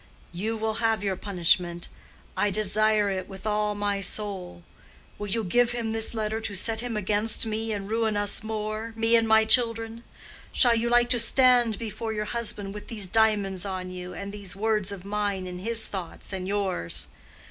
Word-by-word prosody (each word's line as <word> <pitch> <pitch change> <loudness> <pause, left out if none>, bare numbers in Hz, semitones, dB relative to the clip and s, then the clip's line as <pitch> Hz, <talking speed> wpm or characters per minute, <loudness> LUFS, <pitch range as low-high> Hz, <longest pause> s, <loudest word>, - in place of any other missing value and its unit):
You 215 +6 -2
will 220 0 -1
have 225 -2 +2
your 195 -2 0
punishment. 175 -2 +1 0.5
I 205 - +2
desire 215 +1 +2
it 190 0 -4
with 195 +1 -10
all 210 -1 0
my 205 -1 -1
soul. 190 -3 -4 0.6
Will 205 - -4
you 220 +3 -1
give 240 +5 +2
him 230 -2 -2
this 225 +1 +1
letter 220 0 -2
to 205 -2 -2
set 220 +4 -1
him 235 -2 -3
against 210 +3 +1
me 220 0 -2
and 200 -2 -3
ruin 220 -1 0
us 205 -1 0
more—me 220 +1 -1
and 225 -1 +4
my 220 0 +5
children? 230 0 +3 0.5
Shall 245 -3 +5
you 230 +1 +1
like 240 0 +4
to 245 - +4
stand 240 -2 +4
before 220 0 -4
your 210 0 -2
husband 210 -3 -3
with 210 - -8
these 210 -4 -2
diamonds 200 -2 +2
on 185 -2 -4
you, 180 0 -7
and 200 0 -6
these 200 -2 -7
words 210 -1 0
of 195 -2 -8
mine 200 -2 -1
in 180 0 -6
his 225 +3 -1
thoughts 190 0 -6
and 185 -1 -4
yours? 195 - -1
210 Hz, 180 wpm, -26 LUFS, 195-225 Hz, 0.6 s, my